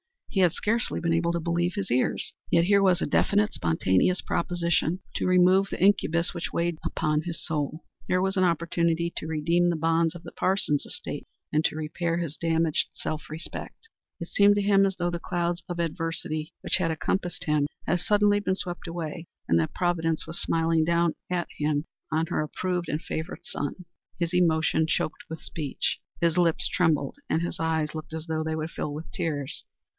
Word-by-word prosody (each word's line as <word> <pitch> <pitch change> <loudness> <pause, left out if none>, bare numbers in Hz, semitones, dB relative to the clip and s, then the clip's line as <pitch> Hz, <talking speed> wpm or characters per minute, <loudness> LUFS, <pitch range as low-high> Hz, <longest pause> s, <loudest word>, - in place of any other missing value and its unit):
He 195 - -1
had 180 -3 +5
scarcely 230 +3 0
been 165 -1 +1
able 170 +1 +1
to 170 - -1
believe 175 +2 0
his 200 -2 -3
ears. 125 +1 +1 0.2
Yet 170 - +4
here 200 +2 +4
was 185 -2 +4
a - - +2
definite, 210 +1 +2
spontaneous 95 - +2
proposition 170 0 0
to - - 0
remove 185 +2 +5
the - - -5
incubus 175 -4 +3
which 170 - -4
weighed 170 -1 0
upon 155 -2 0
his 170 0 -5
soul. 155 0 -2 0.2
Here 185 0 +2
was 190 +1 0
an 185 - +4
opportunity 170 0 +1
to 155 - -3
redeem 170 +3 +2
the 170 - +1
bonds 165 +1 +2
of 175 - -9
the - - -9
Parsons 185 -6 +1
estate - - -5 0.2
and 155 +1 +2
to - - +1
repair 165 +2 -2
his 165 -3 -3
damaged 165 -1 +1
self 155 0 -4
respect. 160 - -7 0.3
It 170 - -5
seemed 205 0 +5
to 205 - +2
him 195 -1 +5
as 195 -1 0
though 175 -1 -1
the 170 - -3
clouds 175 -1 -1
of 175 -1 -4
adversity 165 -1 -2
which - - +1
had 180 -3 0
encompassed 175 +3 -2
him 150 -2 +2 0.2
had 175 - +1
suddenly 205 +2 +3
been 190 -2 0
swept 180 -3 -4
away, 165 0 -5 0.2
and 85 - +5
that 80 - -1
Providence 165 -3 0
was 165 +1 -4
smiling 165 0 +2
down 170 -1 +2 0.2
at 180 -1 -1
him 150 0 0 0.3
as 160 +1 +1
her - - 0
approved 180 +3 -2
and 150 - -1
favorite 160 +3 -5
son. 145 +6 -4 0.3
His 170 0 -1
emotion 160 -2 +3
choked 155 - -1
his 160 0 -7
speech. 150 -4 -2 0.2
His 170 -1 +2
lip 170 -2 +4
trembled 155 - +1
and 160 - +2
his 175 - -3
eyes 160 -2 0
looked 155 0 -7
as 160 0 -5
though 160 0 -1
they 160 0 -1
would 160 +1 -3
fill 145 - -3
with 155 +3 -7
tears. 145 -4 -3
170 Hz, 190 wpm, -27 LUFS, 160-180 Hz, 0.3 s, had